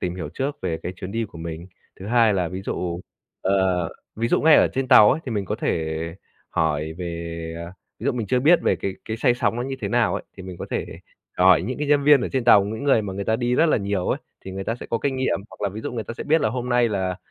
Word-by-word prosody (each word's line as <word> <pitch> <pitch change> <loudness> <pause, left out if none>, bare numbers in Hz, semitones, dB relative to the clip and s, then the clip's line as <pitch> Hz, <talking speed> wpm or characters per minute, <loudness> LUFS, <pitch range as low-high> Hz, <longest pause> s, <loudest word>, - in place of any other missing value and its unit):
tìm 90 -1 -2
hiểu 80 -5 -5
trước 140 +2 -2
về 80 - -2
cái 90 - -4
chuyến 95 +3 -7
đi 115 0 -1
của 85 -5 -11
mình. 85 +1 -6 0.3
Thứ 95 - -7
hai 115 -2 +4
là 90 -3 0
ví 95 +2 -6
dụ 85 -2 -3 0.4
ờ, 95 -3 +1 0.3
ví 115 +2 0
dụ - - +2
ngay 160 -1 +7
ở - - +5
trên 130 -1 -2
tàu 105 - +8
ấy 155 - 0
thì 120 - -3
mình 100 -2 -1
có - - -2
thể 80 -1 -2 0.5
hỏi 80 0 -1
về, 85 -1 -5
ờ, 85 - -10 0.3
ví - - -9
dụ - - +2
mình 115 -4 -3
chưa 125 +5 +1
biết 165 +5 +6
về - - +2
cái 95 - -4
cái 110 - -4
say 120 +1 +3
sóng 120 - 0
nó 120 - -2
như 135 +1 -4
thế 100 - -2
nào 115 -5 +2
ấy, 100 - -3
thì 95 - -9
mình 90 -1 -8
có - - -5
thể - - -2 0.5
hỏi 90 -2 +5
những 125 +8 -4
cái 150 - -2
nhân 145 -1 +3
viên 145 -3 +7
ở - - -2
trên 130 -2 0
tàu, 105 -4 +7
những 110 +6 -5
người 135 -6 +4
mà 100 -2 -5
người 100 +1 -4
ta 110 - +1
đi 120 +1 0
rất 165 - +4
là 155 - +3
nhiều 100 -3 -2
ấy, - - 0 0.3
thì 95 - -6
người 95 +1 -5
ta 115 - -1
sẽ - - -9
có 115 - +1
kinh 135 -2 0
nghiệm. 130 -6 0
Hoặc - - -15
là - - +1
ví 105 +3 -7
dụ 110 - -5
người 115 -3 -4
ta 115 - -7
sẽ - - -6
biết 160 +2 +3
là 110 - +2
hôm 125 +2 -4
nay 120 -1 +3
là 95 -3 -2
105 Hz, 295 wpm, -23 LUFS, 90-125 Hz, 0.5 s, tàu